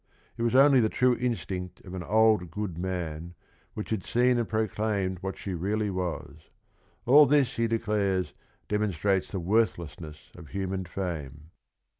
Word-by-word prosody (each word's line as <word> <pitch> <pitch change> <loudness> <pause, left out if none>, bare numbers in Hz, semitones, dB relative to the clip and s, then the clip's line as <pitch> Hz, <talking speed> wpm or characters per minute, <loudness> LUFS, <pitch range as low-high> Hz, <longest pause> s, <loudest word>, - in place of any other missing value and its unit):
It - - -7
was 120 +1 +1
only 135 0 +7
"the 110 -2 +3
true 125 +1 +2
instinct 95 -7 -3
of 90 - -9
an 95 - -4
old 105 0 +3
good 95 0 -4
man" 85 -2 -4 0.4
which 105 - -6
had 110 -4 -1
seen 125 0 +2
and 115 - -2
proclaimed 105 -3 -1
what 95 0 -4
she 95 - -5
really 100 +4 -1
was. 85 -4 -5 0.6
All 145 +4 +7
this 140 -2 +3
he 115 0 +2
declares, 105 -5 0 0.3
demonstrates 100 -2 0
the 95 - -3
worthlessness 85 -6 -2
of 85 -3 -11
human 95 0 -3
fame. 80 -4 -6
95 Hz, 150 wpm, -28 LUFS, 90-110 Hz, 0.6 s, only